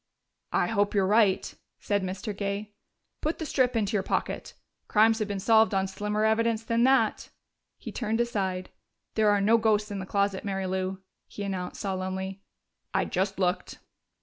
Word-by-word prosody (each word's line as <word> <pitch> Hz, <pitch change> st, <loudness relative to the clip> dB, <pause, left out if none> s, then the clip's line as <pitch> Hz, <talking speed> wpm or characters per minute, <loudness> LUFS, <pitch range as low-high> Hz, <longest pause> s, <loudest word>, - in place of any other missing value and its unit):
"I -, -, +2 dB
hope 205 Hz, -2 st, 0 dB
you're 195 Hz, -2 st, +3 dB
right," 205 Hz, -1 st, +3 dB, 0.3 s
said 205 Hz, -1 st, 0 dB
Mr. 190 Hz, +3 st, -4 dB
Gay. 200 Hz, +1 st, -3 dB, 0.5 s
"Put 310 Hz, +2 st, -1 dB
the 320 Hz, -, -4 dB
strip 255 Hz, -4 st, +1 dB
into 215 Hz, -1 st, 0 dB
your 205 Hz, -, +2 dB
pocket. -, -, -3 dB, 0.3 s
Crimes 225 Hz, +1 st, +4 dB
have 215 Hz, -, -1 dB
been 200 Hz, -1 st, -3 dB
solved 220 Hz, +1 st, +4 dB
on 190 Hz, 0 st, +2 dB
slimmer 210 Hz, +2 st, -1 dB
evidence 225 Hz, 0 st, +2 dB
than 230 Hz, +1 st, +2 dB
that." 265 Hz, 0 st, +2 dB, 0.5 s
He -, -, -8 dB
turned 225 Hz, -1 st, -1 dB
aside. 190 Hz, -6 st, -1 dB, 0.4 s
"There 215 Hz, -1 st, +3 dB
are 205 Hz, 0 st, +4 dB
no 225 Hz, +3 st, +4 dB
ghosts 215 Hz, -2 st, +2 dB
in 200 Hz, -, -3 dB
the 190 Hz, -, -6 dB
closet, 200 Hz, -1 st, 0 dB
Mary 195 Hz, -1 st, -2 dB
Lou," 190 Hz, 0 st, -2 dB, 0.2 s
he 205 Hz, -, -7 dB
announced 185 Hz, -2 st, -4 dB
solemnly. 190 Hz, 0 st, -3 dB, 0.5 s
"I -, -, +2 dB
just 195 Hz, +1 st, -1 dB
looked." 180 Hz, -1 st, -1 dB
205 Hz, 170 wpm, -28 LUFS, 190-220 Hz, 0.5 s, Crimes